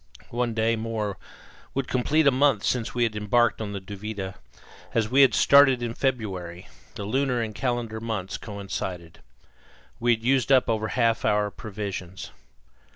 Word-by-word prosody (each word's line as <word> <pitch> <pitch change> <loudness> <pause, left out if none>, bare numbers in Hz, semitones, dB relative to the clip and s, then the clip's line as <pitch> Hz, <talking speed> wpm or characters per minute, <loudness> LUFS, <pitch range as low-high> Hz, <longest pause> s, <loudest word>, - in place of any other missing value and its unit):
One 120 -1 -1
day 115 +1 +2
more 110 -3 -3 0.6
would 135 -1 -1
complete 150 +5 +2
a 140 - +6
month 130 -5 +2
since 125 -2 -1
we 120 - +2
had 115 -2 0
embarked 110 +3 +2
on 105 -2 -4
the 100 - -4
Duvida 100 0 -6 0.6
as 110 -1 +1
we 135 +2 +5
had 135 - +6
started 135 -3 +6
in 115 -1 -2
February, 95 -10 -3 0.3
the 100 - -5
lunar 130 +2 0
and 110 -2 -3
calendar 115 0 -2
months 95 -5 -4
coincided. 95 -5 -6 0.8
We 120 0 +3
had 110 - -14
used 130 0 +2
up 130 -2 +5
over 110 -1 0
half 115 0 +1
our 105 0 +1
provisions. 100 -4 -6
115 Hz, 155 wpm, -25 LUFS, 100-125 Hz, 0.8 s, a